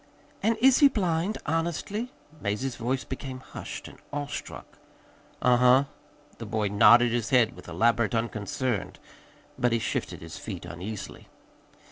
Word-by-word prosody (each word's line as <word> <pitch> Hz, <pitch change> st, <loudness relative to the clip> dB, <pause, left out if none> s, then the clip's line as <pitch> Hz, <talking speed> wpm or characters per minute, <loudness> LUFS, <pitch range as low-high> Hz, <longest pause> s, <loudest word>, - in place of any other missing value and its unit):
"And 225 Hz, +2 st, +2 dB
is 265 Hz, 0 st, +6 dB
he 290 Hz, -, +8 dB
blind, 185 Hz, -4 st, 0 dB
honestly?" 170 Hz, +9 st, -2 dB, 0.3 s
Mazie's 110 Hz, +5 st, -2 dB
voice 125 Hz, +3 st, -2 dB
became 130 Hz, -1 st, -6 dB
hushed -, -, -8 dB
and -, -, -14 dB
awestruck. 145 Hz, 0 st, -6 dB, 0.6 s
"Uh 125 Hz, -1 st, +5 dB
huh." 125 Hz, +2 st, +6 dB, 0.6 s
The 115 Hz, -, -6 dB
boy 105 Hz, -1 st, 0 dB
nodded 115 Hz, +4 st, +6 dB
his 115 Hz, -1 st, -1 dB
head 125 Hz, -4 st, +3 dB
with -, -, -13 dB
elaborate 115 Hz, 0 st, +2 dB
unconcern, 115 Hz, 0 st, -2 dB, 0.7 s
but 120 Hz, -, +2 dB
he 115 Hz, -, +3 dB
shifted 115 Hz, -, -3 dB
his 80 Hz, 0 st, -8 dB
feet 95 Hz, -6 st, -6 dB
uneasily. 95 Hz, +4 st, -7 dB
120 Hz, 135 wpm, -27 LUFS, 110-145 Hz, 0.7 s, he